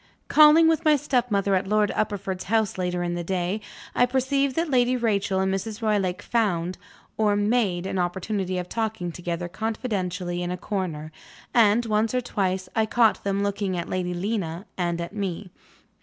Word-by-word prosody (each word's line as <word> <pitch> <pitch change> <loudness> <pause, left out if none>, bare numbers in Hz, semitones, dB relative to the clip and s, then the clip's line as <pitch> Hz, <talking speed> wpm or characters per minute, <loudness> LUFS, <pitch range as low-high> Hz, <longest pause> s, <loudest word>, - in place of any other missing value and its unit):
Calling, 310 +2 +7
with 325 0 +2
my 305 -2 +5
stepmother, 245 -8 +1
at 190 0 +1
Lord 210 0 +2
Uppercliff's 195 -3 -2
house 220 -1 0
later 180 -1 -1
in 175 0 -2
the 175 0 -3
day, 185 +3 -2 0.3
I 245 - +3
perceived 265 +1 +1
that 330 +1 0
Lady 250 0 +3
Rachel 200 -5 0
and 190 0 +1
Mrs. 210 +3 -4
Roylake 200 -4 0
found 185 -6 0 0.4
(or 210 -2 +3
made) 205 -4 +1
an 190 0 -2
opportunity 185 +1 -2
of 180 0 -3
talking 220 -5 -2
together 175 0 -4
confidentially 185 -3 -3
in 175 - -2
a 180 - -3
corner; 170 -7 -4 0.4
and, 230 0 +4
once 215 +2 +1
or 250 - +2
twice, 190 -5 -1
I 220 -1 +2
caught 225 0 +3
them 200 0 0
looking 200 -2 -1
at 170 - -4
Lady 180 -1 -2
Lena 185 -2 -3
and 175 -2 -1
at 170 +3 -5
me. 195 -2 -4
200 Hz, 170 wpm, -25 LUFS, 180-225 Hz, 0.4 s, Calling